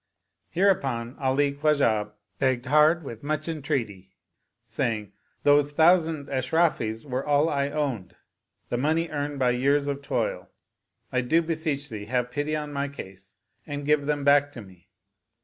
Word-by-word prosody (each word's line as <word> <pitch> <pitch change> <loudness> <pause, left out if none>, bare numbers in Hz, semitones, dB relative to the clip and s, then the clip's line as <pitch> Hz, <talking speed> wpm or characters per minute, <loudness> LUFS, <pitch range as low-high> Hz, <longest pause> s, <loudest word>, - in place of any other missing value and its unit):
Hereupon 135 -11 +1
Ali 140 +1 +1
Khwa 150 +1 +2
jah 105 -6 +1 0.3
begged 130 -2 +1
hard 155 +5 +4
with 115 -5 -8
much 155 +2 -2
entreaty, 130 - -3 0.5
saying, 105 -3 -2 0.2
" - - -43
Those 145 0 +4
thou 160 +4 +7
sand 160 -4 -4
Ashrafis 130 -4 0
were 130 -1 -3
all 145 +2 +2
I 140 -2 0
owned, 135 - -3 0.5
the 120 - -1
money 160 +5 +1
earned 145 -1 -3
by 130 -2 +2
years 140 +3 +1
of 140 0 -3
toil: 140 - -2 0.6
I 125 - +1
do 160 +7 +2
beseech 155 -3 -2
thee 105 -2 -6
have 125 +2 -1
pity 145 +2 -2
on 150 -1 -4
my 140 0 -1
case 95 -9 -10 0.3
and 145 0 -5
give 145 -1 +2
them 145 -1 0
back 145 0 +4
to 120 - -8
me." 95 -1 -18
140 Hz, 160 wpm, -26 LUFS, 125-150 Hz, 0.6 s, thou